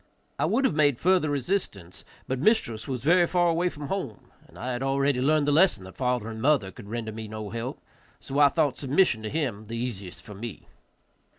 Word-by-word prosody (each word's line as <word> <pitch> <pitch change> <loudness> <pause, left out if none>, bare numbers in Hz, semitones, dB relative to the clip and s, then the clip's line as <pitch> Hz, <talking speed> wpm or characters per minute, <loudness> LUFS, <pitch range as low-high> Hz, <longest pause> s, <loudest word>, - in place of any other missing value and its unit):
I - - +2
would 270 - +2
have - - +2
made 145 -4 +3
further 180 -1 +2
resistance, 135 - -3 0.2
but 130 0 -2
mistress 130 - +1
was 125 -3 -4
very 175 +3 +5
far 175 -1 +2
away 170 +2 +1
from 145 -3 -8
home, 165 - -5 0.2
and - - -17
I 130 - -4
had 125 0 -3
already 135 -1 +1
learned 150 +1 +2
the - - +3
lesson 155 - +4
that 95 0 -11
father 125 -3 -1
and 110 -1 -6
mother 130 -8 +2
could 105 -3 -12
render 115 -1 -4
me 110 0 -7
no 105 -1 -6
help, 115 +3 -5 0.4
so 140 +2 -3
I 145 -1 +7
thought 145 -4 0
submission 140 -3 +2
to 110 - -4
him 120 -9 -3
the 115 +1 -5
easiest 100 -7 -5
for 105 - -10
me. 110 +1 -8
130 Hz, 210 wpm, -26 LUFS, 110-155 Hz, 0.4 s, I